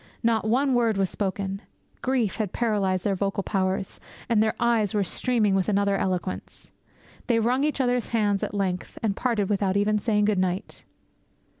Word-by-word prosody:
Not 230 -2 +2
one 265 +3 +2
word 230 -4 +2
was 195 -2 0
spoken. 195 0 -3 0.4
Grief 250 -6 0
had 210 -4 -2
paralysed 200 -6 0
their 200 - +1
vocal 195 +1 -1
powers; 190 -1 -2 0.3
and 225 -3 +3
their 220 0 +1
eyes 225 -4 +2
were 205 - +2
streaming 215 +1 +1
with 195 +1 +1
another 200 -1 +2
eloquence. 185 -1 -3 0.6
They 235 -2 +3
wrung 245 +5 +1
each 300 -1 0
other's 245 -2 +1
hands 205 -4 +1
at - - -3
length, 185 -3 -2
and 205 -3 +1
parted 225 -5 0
without 200 -1 +1
even 210 +1 +2
saying 210 -1 +1
good 205 -2 +1
night! 185 0 -2
205 Hz, 170 wpm, -25 LUFS, 195-230 Hz, 0.6 s, and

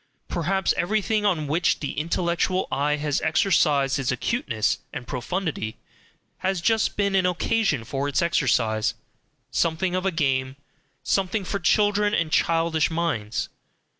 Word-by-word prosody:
Perhaps 190 +3 0
everything 210 +3 +1
on 165 -6 0
which 160 +4 +1
the 145 - -3
intellectual 170 +3 0
eye 145 +2 +1
has 150 -1 -1
exercised 155 -5 +2
its 135 - 0
acuteness 120 - -1
and 125 - -6
profundity 135 - -3 0.6
has 190 -1 0
just 220 +5 +1
been 200 -1 +1
an 190 -1 +3
occasion 180 - 0
for 135 +5 -3
its 145 - 0
exercise, 125 -10 +1 0.6
something 170 +2 0
of 185 0 -1
a - - +1
game, 135 -5 0 0.5
something 195 +2 0
for 200 - -2
children 205 +2 +2
and 160 -2 0
childish 165 -1 +2
minds. 160 -11 -2
165 Hz, 135 wpm, -24 LUFS, 140-190 Hz, 0.6 s, an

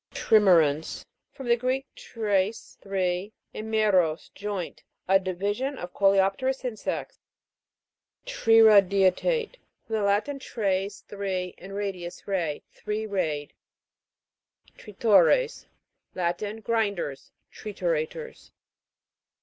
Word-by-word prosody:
TRIME'RANS. 165 -8 +3 0.3
From 265 -3 -9
the 235 - +5
Greek, 255 +3 -1
treis, 210 -1 -2
three, 190 +1 -2 0.2
and 220 +1 -6
meros, 185 -7 +2
joint. 200 -4 -5 0.3
A 195 +1 +5
division 205 +9 -2
of 175 0 -7
coleopterous 200 +7 +2
insects. 235 -4 -4 1.1
TRIRA'DIATE. 225 - +4 0.3
From 225 - -3
the 215 - 0
Latin, 205 +8 +1
tres, 200 -5 -2
THE - - -10
three, 185 -2 -2
and 195 +2 -9
radius, 190 -4 -5
ray. 170 -7 -2
Three* 210 +1 -4
rayed. 160 -8 -2 1.2
TRITO'RES. 210 - +2 0.5
Latin. 185 +5 -2
Grinders; 200 -11 -2 0.2
tri 215 - -8
turators. 180 - -3
200 Hz, 95 wpm, -26 LUFS, 185-225 Hz, 1.2 s, the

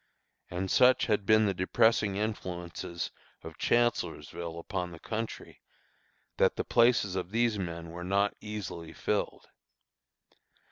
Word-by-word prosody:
And 90 +2 -3
such 130 0 +5
had 105 -3 0
been 110 0 +6
the 100 - +1
depressing 100 +2 +2
influences 90 -5 -4 0.3
of - - -10
Chancellorsville 85 -8 0
upon 90 +1 -3
the 85 -1 -11
country, 110 +4 -5 0.8
that - - +3
the - - -1
places 120 -5 +3
of 90 -1 -3
these 115 0 +1
men 85 -2 -5
were 90 +1 -7
not 100 +2 +2
very 105 - -7
easily 85 -6 -6
filled. - - -2
95 Hz, 130 wpm, -30 LUFS, 85-110 Hz, 0.8 s, been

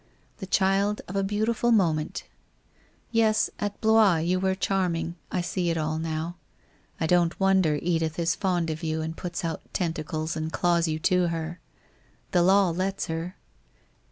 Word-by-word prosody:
The 190 - -7
child 195 +2 +2
of 185 - -7
a 195 - +2
beautiful 220 +4 0
moment. 165 -8 +1 0.9
Yes, 220 -2 +2
at 205 -1 -3
Blois 220 -4 +5
you 175 +3 0
were 190 0 +1
charming, 175 -4 -1 0.2
I 180 - 0
see 175 0 -1
it 165 - 0
all 155 0 -1
now. 160 +2 -3 0.6
I 160 - 0
don't 175 +1 +2
wonder 190 -5 +3
Edith 165 -2 -1
is 170 -1 +1
fond 175 -4 0
of 155 - -5
you 160 -1 -2
and 160 +1 -4
puts 180 +1 -5
out 165 -2 -3
tentacles 160 -2 -2
and 160 0 -3
claws 170 0 +2
you 155 -1 -1
to 180 +1 +3
her. 165 +1 -4 0.7
The 180 - +3
law 190 0 +4
lets 190 +3 -2
her. 165 +2 -4
175 Hz, 160 wpm, -26 LUFS, 160-195 Hz, 0.9 s, Blois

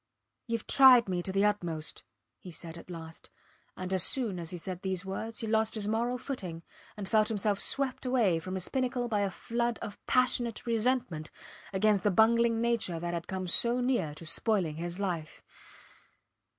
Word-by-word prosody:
Youve 230 -1 -2
tried 260 -4 +7
me 180 -2 -1
to 190 - -4
the 195 +2 +2
utmost, 170 -7 -1 0.4
he 185 - -11
said 165 -1 -7
at 170 - -12
last; 165 -2 -9 0.5
and 185 +1 -4
as 190 - +3
soon 215 -3 +3
as 165 -1 -5
he 180 - -4
said 180 +1 -5
these 190 -1 -3
words 220 +4 -5
he - - -3
lost 220 0 +1
his 210 -2 -2
moral 235 +3 0
footing, 185 - -6 0.3
and 200 -2 -5
felt 215 0 +3
himself 205 -2 0
swept 275 -2 +1
away 235 -10 +2
from 185 +3 -6
his 185 -1 -1
pinnacle 255 -2 -1
by 215 -3 0
a 200 -1 +1
flood 235 +3 -2
of 205 - -8
passionate 245 -3 +1
resentment 230 -8 0 0.4
against 200 +1 +2
the 205 - +2
bungling 230 +3 +3
creature 230 -8 0
that 175 +1 -3
had 170 -1 -4
come 190 -1 -4
so 235 +7 +3
near 245 - 0
to 165 - -9
spoiling 175 -3 +1
his 175 +2 -5
life. 175 -6 -4
205 Hz, 180 wpm, -30 LUFS, 175-235 Hz, 0.5 s, tried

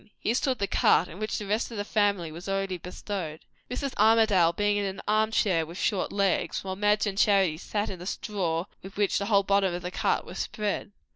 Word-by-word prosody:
Here 225 - 0
stood 255 +1 0
the 200 - 0
cart, 180 -2 +3
in 180 - -11
which 215 0 -2
the 210 - -5
rest 210 +4 0
of 230 - -7
the 205 - -2
family 200 -6 +1
was 175 +5 -8
already 195 -2 -1
bestowed; 180 -3 -5 0.3
Mrs. 260 +2 -3
Armadale 215 -6 +5
being 205 +3 +1
in 205 - 0
an 190 0 -4
arm 215 +1 +3
chair 190 -6 +2
with 165 +3 -9
short 195 -3 0
legs, 200 -3 0
while 190 -1 -4
Madge 210 +2 +2
and 200 -1 -2
Charity 190 -7 +3
sat 205 +3 -2
in 185 - -7
the 180 - -7
straw 180 -7 -2 0.2
with 195 +1 -11
which 205 -1 +2
the 200 - -3
whole 200 -2 +4
bottom 195 -1 +2
of 175 - -6
the 180 - -4
cart - - 0
was - - -8
spread. 210 -1 -3
200 Hz, 225 wpm, -27 LUFS, 180-210 Hz, 0.3 s, Armadale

